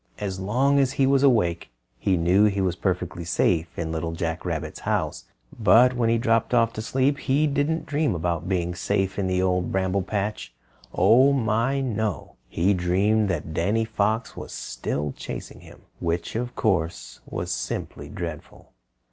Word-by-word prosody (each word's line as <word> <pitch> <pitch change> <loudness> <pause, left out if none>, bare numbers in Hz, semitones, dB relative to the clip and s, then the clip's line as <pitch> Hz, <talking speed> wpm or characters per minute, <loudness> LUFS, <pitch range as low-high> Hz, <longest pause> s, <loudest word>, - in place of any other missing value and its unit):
As 95 -2 -4
long 130 +9 +2
as 135 -1 +2
he 135 - +2
was 135 0 +3
awake, 105 - +2 0.3
he 95 +7 +1
knew 90 +5 +4
he 100 -2 +1
was 90 -3 0
perfectly 90 -2 -2
safe 85 0 0
in 80 -1 -3
Little 80 0 -3
Jack 80 0 -3
Rabbit's 80 -4 -4
house. - - -2 0.3
But 115 +5 +5
when 120 -2 +1
he 115 - +3
dropped 115 +1 +1
off 115 -1 +3
to 110 - -4
sleep 135 +5 +1
he 145 +3 +2
didn't 150 +3 0
dream 145 - 0
about 85 0 -2
being 90 -2 0
safe 95 +2 -1
in 95 - 0
the 90 0 +1
Old 90 -1 0
Bramble 95 +1 0
Patch. 100 - -3 0.4
Oh, 120 +9 +5
my, 120 +2 +1
no! 110 -6 -3
He 90 +9 +2
dreamed 100 +4 +2
that 80 -3 -3
Danny 100 +8 +1
Fox 110 +2 -1
was - - -8
still 70 +4 -3
chasing - - -7
him, - - -15 0.2
which, 85 +3 -2
of 120 +2 -3
course, 85 -6 -1
was 90 +1 -4
simply - - -4
dreadful. 85 -3 -8
100 Hz, 165 wpm, -24 LUFS, 85-115 Hz, 0.4 s, But